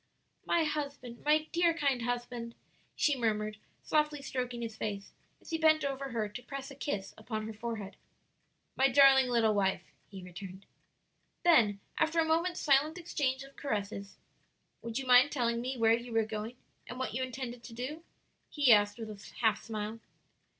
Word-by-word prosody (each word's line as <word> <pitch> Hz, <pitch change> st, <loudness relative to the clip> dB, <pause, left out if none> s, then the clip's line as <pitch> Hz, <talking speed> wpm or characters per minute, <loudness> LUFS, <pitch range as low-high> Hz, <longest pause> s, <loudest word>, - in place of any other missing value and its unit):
"My 335 Hz, -, +3 dB
husband, 285 Hz, -6 st, -4 dB
my 305 Hz, +1 st, +3 dB
dear, 340 Hz, -1 st, +3 dB
kind 280 Hz, -6 st, +1 dB
husband!" 240 Hz, -1 st, -3 dB, 0.4 s
she 295 Hz, -, +2 dB
murmured, 215 Hz, -3 st, -1 dB, 0.3 s
softly 300 Hz, -2 st, +1 dB
stroking 250 Hz, -3 st, -3 dB
his 225 Hz, -1 st, -5 dB
face 200 Hz, -2 st, -5 dB, 0.3 s
as -, -, -13 dB
he 325 Hz, -, -1 dB
bent 310 Hz, -2 st, +4 dB
over 275 Hz, 0 st, -3 dB
her 225 Hz, -3 st, -1 dB
to 210 Hz, +4 st, -8 dB
press 275 Hz, +2 st, -7 dB
a -, -, -9 dB
kiss 205 Hz, -8 st, -4 dB
upon 220 Hz, -1 st, -4 dB
her 220 Hz, -, -6 dB
forehead. 215 Hz, -2 st, -5 dB, 0.8 s
"My 270 Hz, -, +4 dB
darling 270 Hz, -1 st, +6 dB
little 230 Hz, -3 st, +3 dB
wife," 195 Hz, -2 st, +1 dB, 0.3 s
he 195 Hz, -2 st, -9 dB
returned. 185 Hz, +1 st, -9 dB, 0.8 s
Then 220 Hz, -, +4 dB, 0.2 s
after 320 Hz, +1 st, +2 dB
a 325 Hz, -, +4 dB
moment's 335 Hz, +3 st, +1 dB
silent 300 Hz, +3 st, +3 dB
exchange 285 Hz, -6 st, -1 dB
of 275 Hz, 0 st, -15 dB
caresses, 200 Hz, -5 st, -4 dB, 0.6 s
"Would 230 Hz, -1 st, -4 dB
you 270 Hz, -, -3 dB
mind 255 Hz, +3 st, +6 dB
telling 235 Hz, -4 st, 0 dB
me 255 Hz, +1 st, -3 dB
where 225 Hz, -1 st, +4 dB
you 235 Hz, +1 st, -2 dB
were 225 Hz, -1 st, +3 dB
going 220 Hz, +2 st, -5 dB, 0.3 s
and 245 Hz, -, -7 dB
what 260 Hz, -3 st, -3 dB
you 260 Hz, -, -2 dB
intended 255 Hz, -2 st, -5 dB
to 235 Hz, -, -10 dB
do?" 285 Hz, +7 st, -5 dB, 0.5 s
he 285 Hz, -6 st, +5 dB
asked 205 Hz, 0 st, +3 dB
with 220 Hz, -2 st, -6 dB
a 205 Hz, -1 st, -12 dB
half 220 Hz, -2 st, +3 dB
smile. 220 Hz, 0 st, -4 dB
245 Hz, 170 wpm, -32 LUFS, 220-280 Hz, 0.8 s, darling